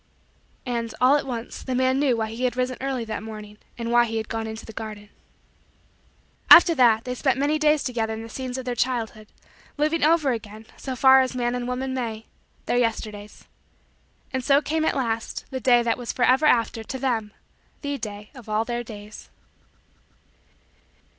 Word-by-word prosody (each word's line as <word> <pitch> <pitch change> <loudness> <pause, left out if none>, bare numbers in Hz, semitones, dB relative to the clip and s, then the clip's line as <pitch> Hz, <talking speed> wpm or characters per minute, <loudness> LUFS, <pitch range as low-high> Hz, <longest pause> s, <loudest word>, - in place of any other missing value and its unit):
And, 235 -2 -3
all 255 +3 +5
at 290 - -1
once, 235 -2 -5
the 260 - -3
man 260 +1 +2
knew 270 -5 +2
why 220 -1 -2
he 240 +3 -2
had 250 0 -1
risen 255 0 0
early 265 -3 -2
that 220 -2 -4
morning 210 -1 -9 0.2
and 235 0 -3
why 240 0 +5
he 225 -1 -3
had 220 0 -4
gone 225 -1 -3
into 220 0 -7
the 225 - -10
garden. 210 -1 -8 1.4
After 340 0 +10
that, 235 -6 +4
they 250 - -3
spent 265 +1 0
many 290 +3 +1
days 305 -1 +3
together 230 -3 -2
in 220 - -7
the - - -8
scenes 255 +2 -5
of 260 - -6
their 250 - -2
childhood; 230 -3 -2 0.5
living 305 +2 +1
over 310 -3 +4
again, 220 -1 -6
so 260 -1 -5
far 265 +1 +7
as 255 -1 -2
man 240 -1 0
and 245 0 -3
woman 260 +1 -3
may, 225 -4 -4 0.4
their - - 0
Yesterdays. 215 -3 -3 0.9
And 260 -1 -2
so 275 +2 +4
cane, 315 +1 -1
at - - +1
last, 230 -4 -2
the 260 - -3
day 240 -1 +4
that 235 0 0
was 240 - -4
forever 260 +4 +3
after, 230 -3 +2
to 265 - -5
them, 235 -5 -1 0.5
the 285 -1 -3
day 210 -1 -7
of 245 -5 -13
all 215 +1 0
their 240 +1 -3
days. 210 -2 -11
245 Hz, 185 wpm, -24 LUFS, 225-260 Hz, 1.4 s, After